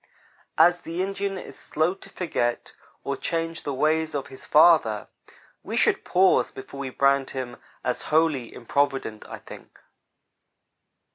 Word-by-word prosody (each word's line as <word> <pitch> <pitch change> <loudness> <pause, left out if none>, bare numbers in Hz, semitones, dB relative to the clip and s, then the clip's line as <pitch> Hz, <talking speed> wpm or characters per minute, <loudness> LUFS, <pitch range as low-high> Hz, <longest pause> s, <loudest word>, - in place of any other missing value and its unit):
As 175 0 +6
the 175 +1 -3
Indian 195 0 -3
is - - -8
slow 160 +4 0
to 195 - -15
forget 120 -9 -2 0.3
or - - -2
change 165 0 -3
the 145 - -3
ways 155 +2 +1
of 140 - -2
his 130 - -11
father, 150 -10 +5 0.5
we - - -4
should - - +3
pause 185 +1 +3
before 135 +1 -10
we 135 -1 -3
brand 140 +1 +2
him 130 -2 -5 0.3
as 125 0 -1
wholly 155 -6 +2
improvident, 135 -3 -1
I - - -6
think. - - -13
150 Hz, 140 wpm, -25 LUFS, 130-165 Hz, 0.5 s, As